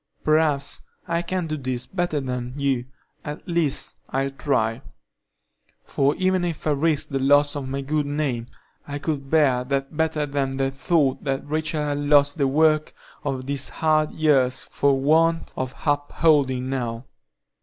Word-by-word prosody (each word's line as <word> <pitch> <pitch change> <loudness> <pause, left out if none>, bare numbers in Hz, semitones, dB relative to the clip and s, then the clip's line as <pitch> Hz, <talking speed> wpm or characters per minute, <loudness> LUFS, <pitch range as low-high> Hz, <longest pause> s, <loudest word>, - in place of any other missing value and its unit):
Perhaps 155 -2 +1 0.3
I 170 0 0
can 180 0 -2
do 155 -1 -3
this 130 -3 -3
better 175 -5 -1
than 125 -1 -4
you,—at 140 +3 -4
least, 170 -5 -1
I'll 135 +1 -1
try; 125 -4 0 1.0
for 140 +1 +1
even 185 -1 +1
if 170 -3 -3
I 155 - +2
risk 150 +1 +1
the 135 -2 -1
loss 145 +2 +4
of 135 -2 -4
my 135 +1 -2
good 145 +1 -1
name, 140 -5 -2 0.4
I 145 0 -4
could 145 -2 -3
bear 135 -5 +3
that 135 +2 -2
better 160 -1 0
than 140 -2 -2
the 135 0 0
thought 135 0 +1
that 135 0 -2
Rachel 155 0 -1
had 145 -1 -1
lost 145 +1 +3
the 140 - +3
work 155 +2 +2 0.3
of 130 -3 -3
these 140 -1 0
hard 155 -1 +1
years 135 -5 +2
for 140 -1 +1
want 165 +4 +2
of 130 -1 -4
upholding 145 -3 +2
now. 120 -2 -3
145 Hz, 155 wpm, -23 LUFS, 135-155 Hz, 1.0 s, loss